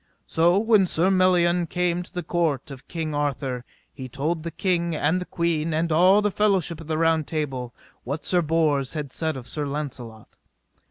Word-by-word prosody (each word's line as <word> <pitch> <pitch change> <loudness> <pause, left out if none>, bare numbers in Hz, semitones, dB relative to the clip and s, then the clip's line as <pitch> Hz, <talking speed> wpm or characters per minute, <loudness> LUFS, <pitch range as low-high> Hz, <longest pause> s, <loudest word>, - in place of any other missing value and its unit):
So 170 +3 +3
when 215 -3 +4
Sir 175 +3 +2
Melion 180 -2 +3
came 180 0 0
to 180 - -11
the 180 - -4
court 155 -5 -1
of 135 -1 -11
King 160 -3 -4
Arthur 140 -4 -2 0.3
he 130 -1 -8
told 155 +6 -2
the 170 - -4
king, 170 -1 -1
and 160 +5 +1
the - - -4
queen, 165 -3 -1
and 165 +1 0
all 185 +6 +5
the 210 - +1
fellowship 190 -6 +1
of 160 - -11
the 160 -1 -1
Round 160 -2 +2
Table, 135 -6 -3 0.3
what 140 +5 -5
Sir 180 -1 +3
Bors 155 -4 +1
had 145 -4 -4
said 160 -3 -2
of 125 -1 -9
Sir 150 +1 -3
Launcelot. 130 -6 -7
160 Hz, 185 wpm, -24 LUFS, 145-175 Hz, 0.3 s, all